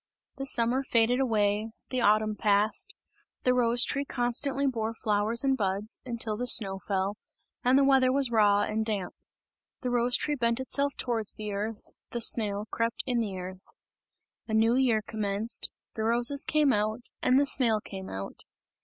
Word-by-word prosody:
The 270 0 -3
summer 240 +1 +1
faded 240 0 +2
away, 215 -3 0 0.2
the 255 -1 -1
autumn 215 0 +2
passed, 210 - 0 0.5
the 250 - +3
rose 240 -1 +3
tree 280 - -1
constantly 270 +2 -1
bore 230 -4 -2
flowers 215 +3 +1
and 270 -1 +2
buds, 200 -1 -3
until 235 -3 -3
the 245 +3 -3
snow 195 -5 +4
fell, 195 +1 -2 0.5
and 255 +2 +4
the 280 - +4
weather 265 -2 +4
was 270 -2 +3
raw 205 -2 +3
and 220 +1 -2
damp. 205 -5 -3 0.7
The 250 - -2
rose 245 0 +1
tree 300 - -2
bent 235 -3 0
itself 280 +2 -1
towards 225 -4 0
the 210 -1 -6
earth, 210 +2 -4 0.3
the 240 - -4
snail 210 -3 +1
crept 230 0 -2
in 245 -2 0
the 200 -4 -4
earth. 185 - -9 0.7
A 220 - -2
new 225 +1 +3
year 245 -4 +2
commenced; 210 +1 0 0.2
the 220 - -4
roses 240 +5 +3
came 300 -4 +2
out, 215 +2 -1 0.2
and 255 +1 +3
the 285 - +3
snail 235 -6 +2
came 190 -2 -9
out. 95 +1 -7
230 Hz, 170 wpm, -28 LUFS, 210-255 Hz, 0.7 s, snow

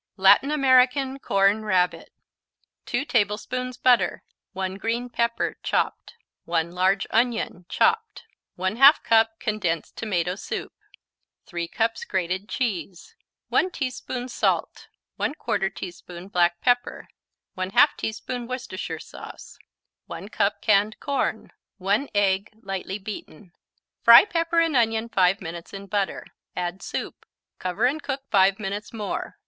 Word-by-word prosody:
Latin 195 +8 +6
American 265 -1 +3
Corn 200 -1 +2
Rabbit 185 -4 0 0.8
2 245 +4 -1
tablespoons 250 +2 -1
butter 250 -2 +3 0.3
1 190 0 -3
green 235 +4 -2
pepper, 235 0 -1
chopped - - -1 0.3
1 170 0 0
large 185 +2 +1
onion, 225 -6 0
chopped 450 -1 +1 0.3
1/2 225 - +5
cup 225 0 +3
condensed 190 -7 -2
tomato 180 -5 -1
soup 195 - -6 0.7
3 170 -2 -4
cups 225 +4 -1
grated 190 +2 -2
cheese 195 - -3 0.4
1 370 - +2
teaspoon 255 -5 -4
salt 250 - -1 0.3
1/4 195 -9 -1
teaspoon 175 0 -8
black 175 -2 +2
pepper 245 0 0 0.5
1/2 190 +10 +4
teaspoon 235 +2 -4
Worcestershire 255 +1 -5
sauce - - -11 0.5
1 - - -8
cup - - 0
canned 210 0 +2
corn 270 -5 -2 0.3
1 205 +8 0
egg, 195 0 +2
lightly 195 0 -4
beaten 195 -3 -9 0.5
Fry 235 +7 +9
pepper 335 -3 0
and 330 -3 +1
onion 225 -1 +1
5 190 -2 +3
minutes 170 +2 -8
in 195 0 -8
butter; 200 -1 -2 0.3
add 180 +1 -3
soup, - - -5 0.4
cover 180 +5 -1
and 290 +5 +1
cook 270 -1 -4
5 195 0 +4
minutes 205 0 -4
more. 215 -3 -5
210 Hz, 120 wpm, -24 LUFS, 190-250 Hz, 0.8 s, Fry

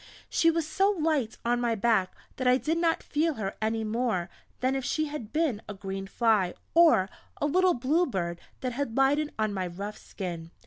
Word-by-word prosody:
She 330 - +4
was 330 -1 +1
so 385 +5 +2
light 310 - 0
on 240 +1 +2
my 235 -1 +1
back 215 -4 +1 0.2
that 255 - -1
I 250 0 +6
did 320 +5 -1
not 330 -1 +1
feel 310 +1 0
her 200 -4 -4
any 220 +1 0
more 215 -6 -1 0.3
than 260 +1 +1
if 270 - -2
she 310 +5 0
had 290 -8 -6
been 300 -9 0
a 205 - -5
green 195 0 -5
fly, 210 -5 +2 0.2
or 325 - +6 0.3
a - - +1
little 365 +4 +3
blue 295 +9 +2
bird 170 -7 -3 0.2
that 255 -2 -2
had 250 -2 -3
lighted 290 +3 +3
on 215 -1 0
my 185 -2 -2
rough 200 +4 -6
skin. 170 -4 -6
240 Hz, 195 wpm, -28 LUFS, 205-305 Hz, 0.3 s, I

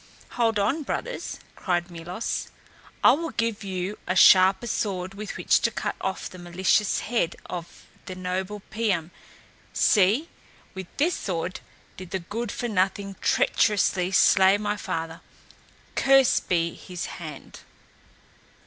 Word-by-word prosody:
"Hold 230 -3 +1
on, 215 +10 +1
brothers," - - -4 0.2
cried 175 -1 -1
Milos. 175 +6 -4 0.5
"I - - +9
will 330 +3 -1
give 230 -4 -2
you 190 +1 -4
a 185 - 0
sharper 190 +4 +6
sword 195 -5 -2
with 205 +1 -6
which - - +3
to - - +1
cut - - -3
off 190 0 -3
the 185 - -12
malicious 185 +4 +1
head 220 -7 -1
of 175 -2 -8 0.2
the 185 - -6
noble 185 +2 -4
Piam. 195 -7 -1 0.6
See, 215 - +3 0.5
with 190 -1 -7
this 330 +5 +2
sword 180 - -3 0.4
did 185 -1 -9
the 190 - -1
good 205 +5 -5
for 240 - -3
nothing 195 -1 -1
treacherously 190 -3 +2
slay 190 +1 +5
my 210 0 -2
father. 165 -5 -5 0.7
Cursed 270 -2 +4
be 170 -2 +1
his 180 -1 -7 0.2
hand!" 155 -4 -9
190 Hz, 130 wpm, -25 LUFS, 180-215 Hz, 0.7 s, I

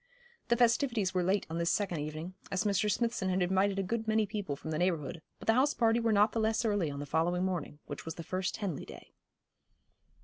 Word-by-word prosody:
The 235 - +3
festivities 235 -4 +2
were 185 - +2
late 190 +3 +1
on 165 +1 -4
this 170 0 +1
second 185 -5 0
evening, 155 +4 -5 0.2
as 190 +1 0
Mr. 210 0 +2
Smithson 230 -3 0
had 185 0 +2
invited 190 +2 +2
a 195 - +1
good 225 +3 -2
many 220 0 +3
people 200 -7 -3
from 155 +3 -7
the 155 - -1
neighbourhood, 165 -4 -1 0.2
but - - -11
the 225 - +5
house 270 +5 +3
party 230 -1 +3
were 230 -1 +1
not 210 +1 +4
the 230 - -1
less 220 +2 +1
early 205 -7 +1
on 140 0 -5
the 145 - -4
following 170 +5 +1
morning, 175 -6 -3
which - - -7
was 165 - -6
the 165 - -7
first 185 +3 -2
Henley 190 -9 -3
day. - - -12
190 Hz, 230 wpm, -32 LUFS, 170-220 Hz, 0.2 s, the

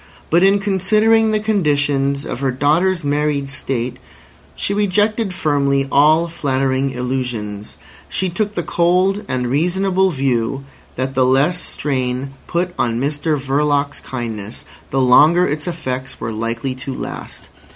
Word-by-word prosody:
But 170 +2 +4
in 195 +1 +5
considering 215 +3 +3
the 215 0 +1
conditions 145 -9 +1
of - - -5
her 135 -1 0
daughter's 160 +7 +1
married 145 -1 0
state, 125 -2 -3 0.6
she 200 - 0
rejected 210 +1 +1
firmly 140 -4 +1
all 155 +4 +4
flattering 135 -4 0
illusions. 125 -5 -4 0.3
She 190 - 0
took 205 +4 -2
the 175 - -1
cold 185 +5 +1
and 125 -1 -1
reasonable 185 +7 +1
view 135 -3 -1 0.3
that 130 +1 -2
the 130 -1 +2
less 135 +8 +2
strain 130 -1 -2
put 175 +1 -1
on 115 -1 0
Mr 145 +3 0
Verloc's 145 +1 0
kindness 115 -4 -6 0.2
the 135 - 0
longer 150 +8 +5
its 150 -1 -3
effects 135 -6 -4
were 115 - -4
likely 115 +4 -3
to 130 +1 -6
last. - - -7
145 Hz, 135 wpm, -18 LUFS, 130-180 Hz, 0.6 s, in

